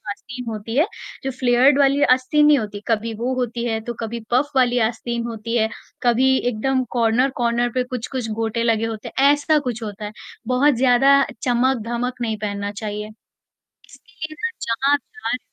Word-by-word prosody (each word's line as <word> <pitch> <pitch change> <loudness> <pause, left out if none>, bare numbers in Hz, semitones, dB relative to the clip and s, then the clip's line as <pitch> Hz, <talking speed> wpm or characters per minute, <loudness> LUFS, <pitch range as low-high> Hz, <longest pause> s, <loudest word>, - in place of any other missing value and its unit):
आस्तीन 250 +5 -7
होती 220 +2 -5
है, 310 - +4 0.4
जो 270 - -1
फ़्लेयर्ड 255 +2 +3
वाली 280 0 +3
आस्तीन 260 +4 +3
नहीं 295 -1 +6
होती, 205 -3 -5
कभी 225 0 0
वो 245 +4 -2
होती 240 -1 -2
है 225 -2 -1
तो 240 - -4
कभी 230 +1 -4
पफ़ 260 +4 +2
वाली 250 -1 +3
आस्तीन 235 +1 -4
होती 230 +1 -4
है, 220 0 +2 0.3
कभी 255 +2 +3
एकदम 255 +3 0
कॉर्नर-कॉर्नर 240 0 +1
पे 255 - +2
कुछ-कुछ 250 -1 -4
गोटे 225 +1 -1
लगे 225 -1 +2
होते 220 -1 -5
हैं, 275 +2 +4
ऐसा 290 +1 +2
कुछ 245 -5 -4
होता 210 -1 -6
है, 210 - -5 0.3
बहुत 260 +4 +3
ज़्यादा 270 +2 +5 0.2
चमक-धमक 245 0 0
नहीं 225 -2 -1
पहनना 205 -1 -3
चाहिए। 210 0 -5 0.6
इसके 280 +5 -21 0.2
लिए 310 - -11
ना 460 - 0 0.2
जहाँ 265 +5 +1
आप 290 - +3
जा 435 +8 -10
रहे - - +1
हो - - -6
245 Hz, 180 wpm, -21 LUFS, 225-265 Hz, 0.6 s, नहीं